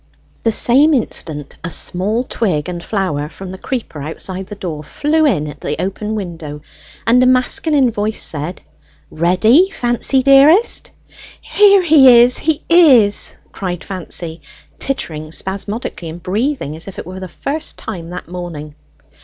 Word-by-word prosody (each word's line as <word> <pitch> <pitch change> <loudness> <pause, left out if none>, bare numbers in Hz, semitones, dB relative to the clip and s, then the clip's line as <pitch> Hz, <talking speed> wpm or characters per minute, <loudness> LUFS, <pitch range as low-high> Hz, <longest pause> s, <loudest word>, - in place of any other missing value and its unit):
The 225 - +1
same 280 +8 +4
instant 150 - -4
a 170 - -3
small 205 +8 -1
twig 185 - -2
and 175 -1 -5
flower 155 -8 -2
from 190 +2 -9
the 190 - -9
creeper 235 - -5
outside 185 +5 -6
the 205 - -8
door 165 -6 -6
flew 305 - +1
in 155 - 0
at 145 - -10
the 150 - -3
open 210 +3 -3
window, 165 -7 -6 0.4
and 240 +3 +4
a 255 - +4
masculine 255 +1 +2
voice 215 0 -2
said, 155 +4 -4 0.5
"Ready, 215 - +3
Fancy 255 -3 +1
dearest?" 285 - +4 0.7
"There 400 -2 +6
he 270 -7 +7
is, 250 +1 +2
he 320 0 -1
is!" 265 -12 +5
cried 180 -3 -5
Fancy, 170 -3 -5 0.4
tittering 155 - -4
spasmodically, 195 -1 -4
and 165 +2 -10
breathing 210 - -2
as 160 - -10
it 195 - -8
were 185 - -9
for 190 - -7
the 185 - -6
first 280 - -5
time 170 -2 -7
that 180 +1 -7
morning. 170 -4 -7
195 Hz, 150 wpm, -16 LUFS, 170-255 Hz, 0.7 s, he